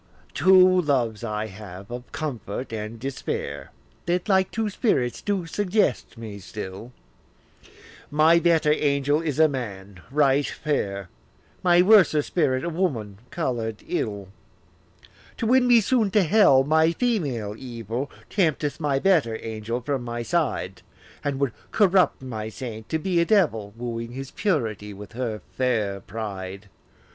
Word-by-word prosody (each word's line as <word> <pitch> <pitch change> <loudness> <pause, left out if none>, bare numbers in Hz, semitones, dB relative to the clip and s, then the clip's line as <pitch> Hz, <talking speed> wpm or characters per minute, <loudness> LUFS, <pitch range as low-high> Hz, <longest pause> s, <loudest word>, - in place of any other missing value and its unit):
Two 185 +4 +6
loves 120 -8 0
I 105 -1 -2
have, 100 -1 -10
of 120 +1 -7
comfort 125 -5 -5
and 110 +1 -5
despair, 135 +2 -4 0.4
That 175 +3 0
like 190 -2 +3
two 220 -1 -2
spirits 130 - 0
do 200 -4 -1
suggest 190 - 0
me 110 -3 -8
still; 100 +4 -8 1.2
My 155 +3 +5
better 165 -3 +3
angel 145 0 +1
is 150 -4 -2
a 160 0 +6
man 100 - -6
right 140 0 +3
fair, 100 - -2 0.5
My 175 -1 +5
worser 185 -7 +5
spirit 140 -7 0
a - - -1
woman 125 - -2
colour'd 115 -9 -3
ill. 100 -3 -3 1.1
To - - -2
win 250 +2 +4
me 240 -1 +7
soon 225 -1 +2
to 200 +1 +3
hell, 165 -8 +5
my 160 +3 +3
female 145 - -1
evil 120 +2 -5 0.2
Tempteth 155 -7 0
my 145 -3 +1
better 140 -9 +2
angel 115 +2 -4
from 135 +1 -2
my 120 0 -4
side, 130 - -1 0.4
And 140 -2 -2
would 140 -3 +1 0.2
corrupt 190 -8 +3
my 110 -4 -5
saint 110 -2 -7
to 160 - +1
be 175 +1 0
a - - +2
devil, 150 - +2
Wooing 115 0 -5
his 135 +1 -7
purity 110 - -2
with 105 0 -10
her 115 -3 -4
fair 110 -6 0
pride. 100 -1 -7
135 Hz, 140 wpm, -24 LUFS, 110-170 Hz, 1.2 s, me